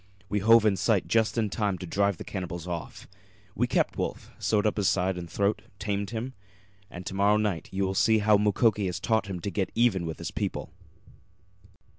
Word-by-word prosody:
We 105 - 0
hove 115 +2 +6
in 100 -3 +3
sight 100 +1 +1
just 115 +1 +2
in 110 -3 0
time 100 -3 -1
to 90 - -7
drive 100 +1 +1
the - - -7
cannibals 90 -3 -5
off. 85 -2 -6 0.5
We - - 0
kept - - 0
Wolf, - - -4
sewed 105 -1 +1
up 105 - +1
his 100 -2 +3
side 95 0 +1
and 85 -1 -7
throat, 100 +4 0 0.2
tamed 100 0 -2
him 120 +3 -4 0.6
and 90 +1 -9
to - - -5
morrow 100 +2 +3
night 105 -6 -1
you 95 +1 -1
will 95 - -1
see 110 +3 +4
how 105 0 +4
Mukoki 105 0 +2
has 90 - -3
taught 110 -2 +1
him 95 -2 -4
to 100 - -3
get 95 -2 -1
even 105 -8 +2
with 80 - -5
his - - -5
people." - - -3
100 Hz, 205 wpm, -27 LUFS, 95-110 Hz, 0.6 s, hove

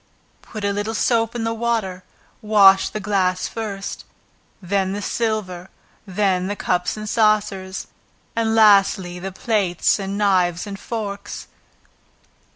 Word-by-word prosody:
Put 215 -2 -7
a 200 - +1
little 205 +2 -3
soap 230 0 +1
in 235 - -2
the 225 0 -1
water, 220 -5 -2 0.4
wash 200 -3 +5
the 215 - -5
glass 190 -3 0
first, 205 -3 -5 0.6
then 190 0 -1
the 205 - -4
silver, 195 -6 -2 0.4
then 190 -1 0
the 205 - -2
cups 180 0 -1
and 215 0 -6
saucers, 205 -4 +1 0.5
and 225 -1 +1
lastly, 195 -4 +4
the 190 +2 -5
plates 195 -3 +1
and 195 0 -4
knives 185 -4 +2
and 200 -1 -7
forks. 205 -3 -6
200 Hz, 130 wpm, -21 LUFS, 190-215 Hz, 0.6 s, wash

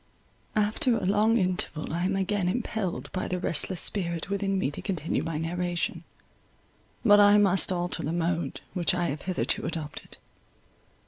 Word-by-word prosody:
After 215 +3 +1
a - - -3
long 215 +4 +3
interval, 180 -6 -1
I 175 +2 -1
am 195 +1 0
again 195 -1 0
impelled 220 -4 -3
by 185 - -3
the 180 - -2
restless 175 +1 0
spirit 170 -2 +1
within 195 -1 0
me 170 -7 0
to - - -7
continue 170 -6 -2
my 165 -2 -3
narration; 175 +2 -2 1.0
but 205 -2 +7
I 205 0 +7
must 195 -2 +5
alter 175 -1 -2
the 150 - -2
mode 170 0 -2
which 180 -1 +1
I 175 -1 0
have 145 +1 -4
hitherto 185 -1 -1
adopted. 160 -3 -6
180 Hz, 155 wpm, -27 LUFS, 170-200 Hz, 1.0 s, but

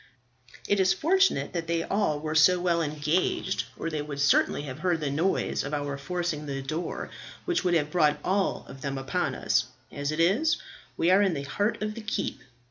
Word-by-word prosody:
"It 205 - +2
is 190 0 +4
fortunate 380 - +2
that 165 -2 -3 0.2
all 195 -8 +1
were 155 +1 -3
so 170 +3 +5
well 175 -1 +1
engaged, 155 +5 0
or - - -3
they 155 -1 -2
would 145 -1 -6
certainly 140 0 +3
have 135 -1 -7
heard 175 -1 +1
the 145 -3 -2
noise 165 +7 0
of 145 +2 -3
our 145 -1 -2
forcing 155 0 -3
the 135 -1 -3
door, 155 +6 -4 0.3
which 355 - 0
would 175 -2 +2
have 150 -2 +1
brought 150 -4 +3
all 195 +1 0
of 135 - -11
them 135 0 -3
upon 135 -1 -1
us. - - +1 0.3
As 145 +1 -2
it 155 - -3
is, 215 - +3 0.4
we 170 - +3
are 190 +2 +6
in 190 -5 +2
the 140 - -3
heart 205 +10 -1
of 215 0 -2
the 230 - -7
keep. 220 0 -3
165 Hz, 200 wpm, -27 LUFS, 145-190 Hz, 0.4 s, are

